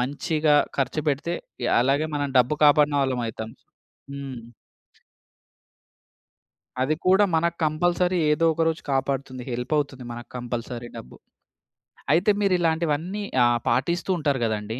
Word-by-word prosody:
మంచిగా 150 +3 +1 0.2
ఖర్చుపెడితే 150 +4 -1 0.3
య - - +1
అలాగే 140 +4 +1
మనం 145 -1 -1
డబ్బు 125 +5 +2
కాపాడిన 145 0 +5
వాళ్ళం 130 -2 -1
అయితాం. 110 0 -6 0.6
హ్మ్. 135 -3 -7 2.4
అది 135 +4 +1
కూడా 190 +3 +5
మనకు 170 +1 0
కంపల్సరీ 175 +3 +1
ఏదో 165 +2 +1
ఒక 165 - -1
రోజు 160 0 -3
కాపాడుతుంది. 135 -1 -2
హెల్ప్ 125 +3 -4
అవుతుంది 135 -3 -3
మనకు 120 +1 -9
కంపల్సరీ 120 0 -5
డబ్బు. 60 - -10 1.0
అయితే 185 +5 +4
మీరు 200 -2 +2
ఇలాంటివన్నీ 165 +3 -1 0.2
ఆహ్, 120 0 +3
పాటిస్తూ 165 +10 0
ఉంటారు 145 -4 0
గదండీ. 110 +1 -3
145 Hz, 120 wpm, -24 LUFS, 125-160 Hz, 2.4 s, కాపాడిన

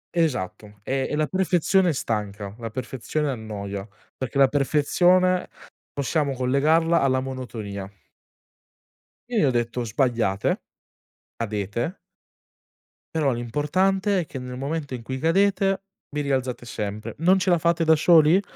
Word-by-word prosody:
Esatto. 105 - -1
E 135 +3 -1
e - - -1
la 155 0 +2
perfezione 185 +1 +2
stanca, 105 -6 -3
la 115 -1 -5
perfezione 130 +5 -3
annoia, 100 -4 -5 0.3
perché 130 0 -4
la 135 -1 +7
perfezione 175 +6 +3 0.4
possiamo 140 0 0
collegarla 150 +6 +3
alla 130 -1 +2
monotonia. 115 -7 -5 1.4
E 240 - -1
gli, - - +5
gli - - +3
ho 135 - +3
detto:" 120 0 -1
Sbagliate, 115 -4 0 0.7
cadete" 110 - -3 1.2
"però 150 -4 +2
l'importante 185 - +1
è - - -5
che 135 - -7
nel 125 0 -7
momento 140 0 -3
in 120 - -8
cui 130 +2 -4
cadete, 195 +4 +2 0.3
vi 150 0 -2
rialzate 130 -3 -2
sempre. 105 -2 -5
Non 180 +4 +5
ce 185 0 +1
la 175 - +4
fate 170 +1 +2
da 160 0 +6
soli? 160 +3 +5
135 Hz, 135 wpm, -24 LUFS, 115-165 Hz, 1.4 s, la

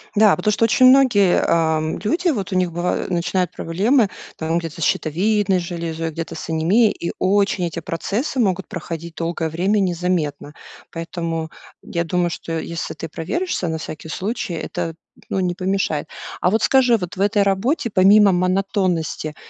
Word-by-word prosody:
Да, 210 0 +6
потому 195 +4 0
что 230 - +2
очень 255 +3 +4
многие, 250 -8 +5
эм, 160 -1 +1
люди, 340 - +1
вот 205 -9 -2
у 185 - -1
них 180 -1 +1
бываю 175 +2 -2
начинают 180 0 0
проблемы 205 +8 +1 0.3
там 160 +1 -1
где-то 170 0 -7
с - - 0
щитовидной 190 +6 +1
железой, 165 -2 -4
где-то 165 +1 -6
с 160 - -7
анемией. 185 +8 +3
И 170 - -4
очень 195 -1 +2
эти 170 0 -4
процессы 205 - -3
могут 190 -4 +1
проходить 170 -1 -6
долгое 165 -1 -2
время 190 +6 +1
незаметно. 175 -5 -1 0.4
Поэтому 165 -1 -4 0.3
я 170 0 -2
думаю, 175 0 0
что 165 0 -4
если 170 +1 -5
ты 165 - -7
проверишься 185 - -2
на 160 - -2
всякий 155 0 -8
случай, 190 +1 -3
это, 165 0 -4 0.3
ну, - - -1
не 180 -1 0
помешает. 185 -5 -1 0.3
А 180 - +3
вот 220 +1 +1
скажи, 250 -3 +4
вот 180 -3 -6
в 190 - -4
этой 205 0 +3
работе, 225 - 0
помимо 200 +1 +6
монотонности, 180 -4 0
180 Hz, 165 wpm, -20 LUFS, 165-205 Hz, 0.4 s, Да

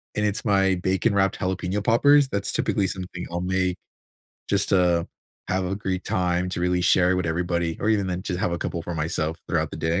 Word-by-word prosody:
and 105 - +1
it's 105 +5 -2
my 95 -2 +3
bacon-wrapped 95 +1 +1
jalapeno 95 +2 -2
poppers. 140 +6 +5
That's 100 -3 -2
typically 100 -3 0
something 90 -1 -6
I'll 85 +1 -2
make 95 0 0 0.7
just - - +1
to 90 -3 +3 0.4
have 95 0 0
a 95 +2 -2
great 95 -2 -3
time 90 -3 0
to 85 - -3
really 90 0 +1
share 90 +1 +3
with 90 -2 -1
everybody 85 0 -1
or 105 - -1
even 100 -3 +2
then 90 0 -3
just 90 -2 -3
have 90 - 0
a 85 - -2
couple 85 - -3
for 85 +1 -5
myself 80 0 -2
throughout - - 0
the - - -7
day. 85 +2 0
90 Hz, 205 wpm, -24 LUFS, 90-95 Hz, 0.7 s, poppers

